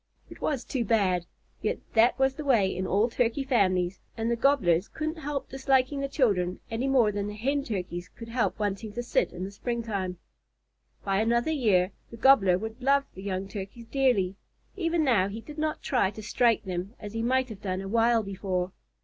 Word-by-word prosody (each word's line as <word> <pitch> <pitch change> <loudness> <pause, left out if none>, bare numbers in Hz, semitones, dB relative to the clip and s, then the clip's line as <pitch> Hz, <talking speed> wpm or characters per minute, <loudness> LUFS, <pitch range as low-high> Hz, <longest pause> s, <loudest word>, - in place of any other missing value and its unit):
It - - -12
was 275 -5 -1
too 255 -4 -1
bad; 190 -6 +1 0.3
yet - - 0 0.2
that 230 +2 +4
was 265 0 +3
the 300 - -6
way 225 -9 +3
in 185 +1 -2
all 205 +4 +3
Turkey 245 +2 0
families, 185 -8 +1 0.2
and 225 +1 0
the - - +2
Gobblers 215 -9 +3
couldn't 315 +1 -4
help 290 -2 -3
disliking 270 +1 +1
the 275 - -1
children 200 - +1
any 235 +4 -1
more 250 -6 +4
than 205 0 -2
the 210 - -5
Hen 275 +6 0
Turkeys 180 -5 -4
could 230 +2 -11
help 235 +1 0
wanting 205 0 -3
to 240 - -3
sit 240 - +1
in 180 - -6
the 195 - -5
springtime. 200 -5 -3 0.9
By 195 +1 +2
another 235 +6 +2
year 205 - +2 0.2
the 230 - -10
Gobbler 220 -8 +5
would 220 +5 -6
love 275 +2 +3
the 190 - -10
young 190 -1 -3
Turkeys 200 +4 -7
dearly. 225 -8 +1 0.4
Even 335 -4 +1
now 225 -9 +3
he 205 +3 -6
did 300 +6 -10
not 310 0 -2
try 245 -8 +2
to 215 +2 -9
strike 235 +1 +2
them, 185 +3 -4
as 210 -1 -8
he 225 - -2
might 260 +2 +1
have 210 -3 -9
done 185 -2 -2
a 195 - -6
while 230 +2 +3
before. 190 -2 -2
225 Hz, 200 wpm, -28 LUFS, 195-260 Hz, 0.9 s, Gobbler